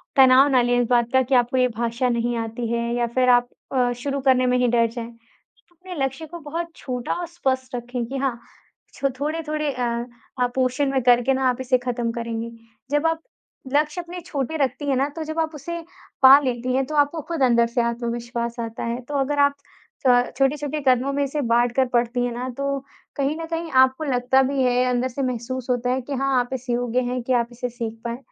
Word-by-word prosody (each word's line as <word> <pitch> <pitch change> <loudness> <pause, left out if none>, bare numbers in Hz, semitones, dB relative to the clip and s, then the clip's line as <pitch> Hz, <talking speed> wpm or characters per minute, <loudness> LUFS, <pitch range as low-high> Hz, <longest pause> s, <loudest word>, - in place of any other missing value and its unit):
तनाव 265 0 +7
ना 255 -2 +4
लें 245 0 +2
इस 240 - +1
बात 240 0 +2
का 260 - +5
कि 260 +1 +1
आपको 245 +1 +2
ये 255 - +4
भाषा 235 +2 0
नहीं 235 0 0
आती 230 +1 -3
है 235 0 -1
या 240 -1 +1
फ़िर 255 +2 +1
आप 245 0 +5 0.3
अ, 250 -1 +3
शुरू 275 +3 -3
करने 260 -1 +3
में 250 0 +2
ही 250 - +2
डर 235 -1 +3
जाएँ। 230 0 -6
आप 230 -1 -26
अपने 365 -1 -8
लक्ष्य 270 +4 -5
को 340 +2 -9
बहुत 330 +3 -4
छोटा 250 -2 -4
और 350 - -3
स्पष्ट 260 -6 -2
रखें 245 0 -4
कि 270 +4 -5
हाँ 265 -3 -1 0.5
छो 275 - -1
थोड़े-थोड़े 305 0 -2
अ 250 -1 -2 0.5
अ, 250 - +3
पोर्शन 260 +2 +1
में 265 -1 +1
करके 245 +2 +4
ना 260 0 +1
आप 250 +1 -2
इसे 255 0 +2
खत्म 245 -2 -2
करेंगी। 230 0 -4 0.4
जब 295 +2 +2
आप 325 0 -1 0.5
लक्ष्य 300 +4 +1
अपने 350 +1 -8
छोटे 315 -2 -3
रखती 285 +1 -1
हैं 270 - +2
ना 275 +2 +1
तो 320 - -4
जब 315 +1 -4
आप 320 0 -1
उसे 340 +4 -5 0.4
पा 265 +1 +10
लेती 255 -2 -2
हैं 265 0 +1
तो 305 - -5
आपको 290 +2 +2
खुद 330 -4 -2
अंदर 235 -2 +4
से 235 +1 0
आत्मविश्वास 235 0 -3
आता 230 -1 -4
है। 235 +2 -2
तो 255 +4 -9
अगर 285 +2 0
आप 285 0 +5 0.6
क 245 0 +4
छोटे-छोटे 290 +2 0
कदमों 255 +2 +3
में 285 0 +1
इसे 285 +2 -2
बाँट 240 -1 +2
कर 265 -1 +4
पढ़ती 240 +1 +1
हैं 245 - -2
ना 250 +2 -4
तो 280 0 -1 0.4
कहीं 280 +2 0
न 325 - -3
कहीं 330 0 -3
आपको 260 +3 +4
लगता 260 -1 +2
भी 270 0 0
है, 250 0 +3
अंदर 250 0 +1
से 260 +2 -5
महसूस 255 0 -3
होता 245 0 0
है 260 +1 0
कि 275 +3 -6
हाँ, 270 -1 +1
आप 245 0 -2
इस 255 -1 -6
योग्य 245 0 0
हैं 250 0 -2
कि 255 - 0
आप 235 -1 +2
इसे 245 +1 -4
सीख 230 -2 -5
पाएँ। 235 0 -3
255 Hz, 225 wpm, -23 LUFS, 240-280 Hz, 0.6 s, पा